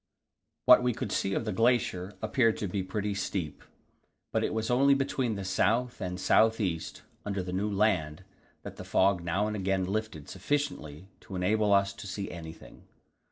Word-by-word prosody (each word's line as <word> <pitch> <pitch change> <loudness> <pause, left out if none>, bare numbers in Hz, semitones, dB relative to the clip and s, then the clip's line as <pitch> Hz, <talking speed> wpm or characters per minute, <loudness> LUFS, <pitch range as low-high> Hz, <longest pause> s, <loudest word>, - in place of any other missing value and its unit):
What 125 - +8
we 125 -2 0
could 100 - -4
see 95 0 0
of - - -2
the 110 - -1
glacier 105 -4 +1
appeared 115 -5 +2
to 105 - -3
be 95 +2 -2
pretty 100 +2 -3
steep; 95 -5 -4 0.7
but - - 0
it - - 0
was 110 +1 -2
only 140 +3 +5
between 135 -4 -1
the 100 -1 -5
south 115 +6 0
and 90 0 -4
south 110 +4 +3
east, 85 -6 -3 0.2
under 100 -2 -3
the 90 0 -5
new 100 +3 -1
land, 95 -6 0 0.4
that - - -9
the - - -7
fog 95 -2 +2
now 85 +5 0
and 105 0 -2
again 95 -1 0
lifted 100 -5 -4
sufficiently 95 - -3
to 105 -4 -10
enable 105 +3 +1
us 100 0 +3
to - - -9
see 100 +1 -5
anything. 80 -1 -11
100 Hz, 180 wpm, -29 LUFS, 95-110 Hz, 0.7 s, What